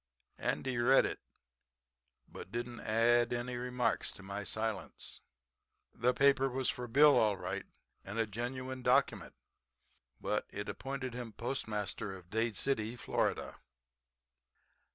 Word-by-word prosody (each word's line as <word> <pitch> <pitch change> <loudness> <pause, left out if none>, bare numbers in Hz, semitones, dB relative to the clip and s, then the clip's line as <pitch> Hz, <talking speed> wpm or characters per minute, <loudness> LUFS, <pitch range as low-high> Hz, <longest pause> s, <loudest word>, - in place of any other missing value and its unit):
Andy 130 -2 -1
read 130 +3 +6
it, - - -3 1.1
but - - -10
didn't 120 +1 -4
add 120 +2 +3
any 120 +1 -2
remarks 125 0 0
to 95 - -12
my 100 +1 -4
silence. 110 +1 -4 0.7
"The 120 +2 +2
paper 135 +1 +4
was 130 0 0
for 125 0 -6
Bill, 145 +5 +7
all 105 -3 +3
right, 95 +2 -4 0.4
and 100 +3 -6
a 115 - +3
genuine 130 +4 -4
document, - - +2 0.8
but - - -1
it - - -5
appointed 135 -2 -4
him 120 -2 -6
postmaster 105 -5 -3
of 90 -1 -17
Dade 110 -1 0
City, 120 -4 0
Fla. 120 - -1
120 Hz, 125 wpm, -34 LUFS, 110-130 Hz, 1.1 s, Bill